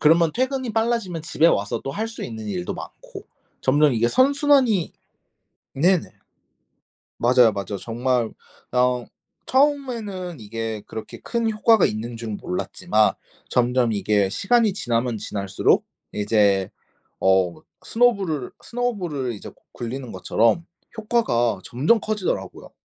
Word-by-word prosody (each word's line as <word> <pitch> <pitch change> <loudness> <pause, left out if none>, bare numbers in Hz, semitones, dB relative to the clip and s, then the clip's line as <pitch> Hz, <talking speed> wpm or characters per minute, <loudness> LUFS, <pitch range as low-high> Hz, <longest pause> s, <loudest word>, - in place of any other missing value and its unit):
그러면 165 +1 +4
퇴근이 260 -1 -1
빨라지면 225 -8 -1
집에 165 0 +2
와서 105 -10 +1
또 135 - -4
할 220 +10 -3
수 230 - -7
있는 110 -2 -7
일도 90 -3 -3
많고. - - -10 0.4
점점 145 +2 +4
이게 120 0 +2
선순환이 265 - +3 0.8
네네. 175 +5 +2 1.1
맞아요, 120 -1 +5
맞아요. 100 0 -4
정말 120 +1 0 0.4
어 125 -1 +2 0.4
처음에는 235 - 0
이게 110 0 -5
그렇게 110 - -8
큰 230 -1 -1
효과가 220 -1 +4
있는 115 +2 -3
줄은 110 -3 -5
몰랐지만 105 +3 0 0.4
점점 125 -1 +2
이게 100 -1 +1
시간이 210 - +2
지나면 120 - -1
지날수록 100 -2 0 0.3
이제 105 -2 +2 0.5
어 95 -2 +3 0.3
스노볼을, 200 - +1
스노볼을 180 - -2
이제 100 - -9
구 - - -20 0.2
굴리는 125 +1 -6
것처럼 115 - +1 0.3
효과가 120 - +1
점점 150 - +2
커지더라고요. 210 -3 -3
130 Hz, 285 characters per minute, -23 LUFS, -, 1.1 s, 맞아요